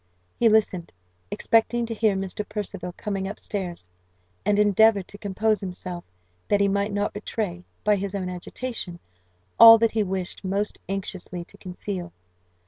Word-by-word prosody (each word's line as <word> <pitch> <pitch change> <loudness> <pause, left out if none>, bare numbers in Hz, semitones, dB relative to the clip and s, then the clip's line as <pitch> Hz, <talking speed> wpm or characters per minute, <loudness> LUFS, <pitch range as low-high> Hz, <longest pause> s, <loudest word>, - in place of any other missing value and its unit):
He 235 - +4
listened, 205 -5 +2 0.4
expecting 235 +1 +2
to 230 - -4
hear 215 -2 +2
Mr. 195 +2 -3
Percival 195 -4 -4
coming 195 -2 -3
up 205 - -6
stairs, 180 - -4 0.6
and 205 -1 +2
endeavoured 210 -1 +4
to 205 - -11
compose 210 +2 0
himself, 180 -2 -6 0.4
that 205 - +3
he 200 - +4
might 200 +1 0
not 205 0 -1
betray, 205 -4 -4 0.2
by 210 -1 +3
his 200 0 -3
own 190 -2 -2
agitation, 180 +1 -5 0.6
all 230 0 +12
that 230 0 +2
he 220 - +1
wished 190 -2 -3
most 200 +2 -2
anxiously 185 -2 -4
to 200 - -16
conceal. 180 -1 -6
200 Hz, 150 wpm, -25 LUFS, 185-215 Hz, 0.6 s, all